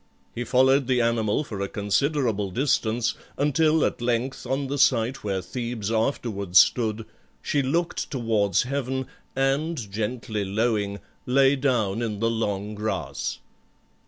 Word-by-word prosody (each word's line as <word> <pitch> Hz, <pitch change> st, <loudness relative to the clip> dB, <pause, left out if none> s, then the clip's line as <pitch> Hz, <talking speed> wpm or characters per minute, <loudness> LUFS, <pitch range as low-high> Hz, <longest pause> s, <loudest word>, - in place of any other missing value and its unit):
He 120 Hz, -, -3 dB
followed 130 Hz, +1 st, +4 dB
the 130 Hz, -2 st, +2 dB
animal 115 Hz, +1 st, +1 dB
for 105 Hz, -8 st, -6 dB
a 100 Hz, -, -1 dB
considerable 110 Hz, 0 st, 0 dB
distance, 120 Hz, 0 st, +1 dB, 0.2 s
until 155 Hz, +2 st, +3 dB
at -, -, -2 dB
length, 120 Hz, +2 st, -1 dB
on 135 Hz, +2 st, -1 dB
the 140 Hz, +1 st, -3 dB
site 125 Hz, 0 st, +2 dB
where 95 Hz, -3 st, -2 dB
Thebes 115 Hz, 0 st, -4 dB
afterwards 110 Hz, -5 st, 0 dB
stood, 110 Hz, +2 st, +4 dB, 0.3 s
she 145 Hz, -, 0 dB
looked 165 Hz, +6 st, -1 dB
towards 110 Hz, -7 st, +1 dB
heaven 130 Hz, 0 st, -2 dB, 0.3 s
and, 135 Hz, -3 st, 0 dB
gently 110 Hz, 0 st, -3 dB
lowing, 100 Hz, -1 st, -1 dB, 0.3 s
lay 135 Hz, +2 st, +4 dB
down 120 Hz, -6 st, 0 dB
in 110 Hz, -3 st, -3 dB
the 115 Hz, +1 st, +1 dB
long 105 Hz, -2 st, -2 dB
grass. 105 Hz, +1 st, -3 dB
120 Hz, 130 wpm, -25 LUFS, 105-135 Hz, 0.3 s, followed